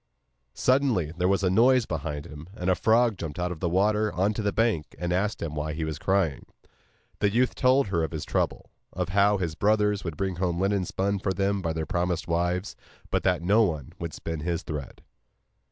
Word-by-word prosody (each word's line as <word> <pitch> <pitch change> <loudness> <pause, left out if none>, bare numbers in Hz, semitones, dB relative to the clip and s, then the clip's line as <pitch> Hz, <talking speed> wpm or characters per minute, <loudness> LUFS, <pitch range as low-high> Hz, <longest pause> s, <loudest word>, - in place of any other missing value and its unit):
Suddenly 125 - +2
there 90 +1 +1
was 100 +1 +2
a 90 - +2
noise 125 +4 +4
close 80 -6 -3
beside 75 -1 -5
him, 75 +4 -10
and 95 -3 0
a - - +5
frog 115 -1 +3
jumped 80 -4 -5
out 90 0 -1
of 85 - -6
the 85 - 0
water 105 +4 +2
on 100 +4 +1
to 110 - -3
the 100 -1 0
bank 110 -10 0
and 90 0 -2
asked 100 +3 -1
him 80 -2 -4
why 75 0 -3
he 80 +1 -3
was 80 -1 -4
crying. 95 -8 0 0.7
The 105 - +3
youth 125 +5 +2
told 130 -2 +3
her 85 -4 +1
of 80 - -1
his 80 -2 -5
trouble, - - -2 0.2
and 90 0 -2
how 100 +2 +3
his 85 -4 -2
brothers 105 +2 +2
would 85 -4 -5
bring 95 -2 -2
home 90 -2 -1
linen 100 0 +1
spun 100 +3 -1
for 95 0 -1
them 100 +1 0
by 80 -2 -1
their 80 -1 -3
promised 85 0 -1
wives, 90 +3 -1 0.4
but - - +1
that 90 -3 +1
no 105 +6 +4
one 80 - -1
would 85 -1 -5
spin 80 -1 -5
his 85 +2 -2
thread. 75 -3 -7
90 Hz, 220 wpm, -26 LUFS, 85-105 Hz, 0.7 s, a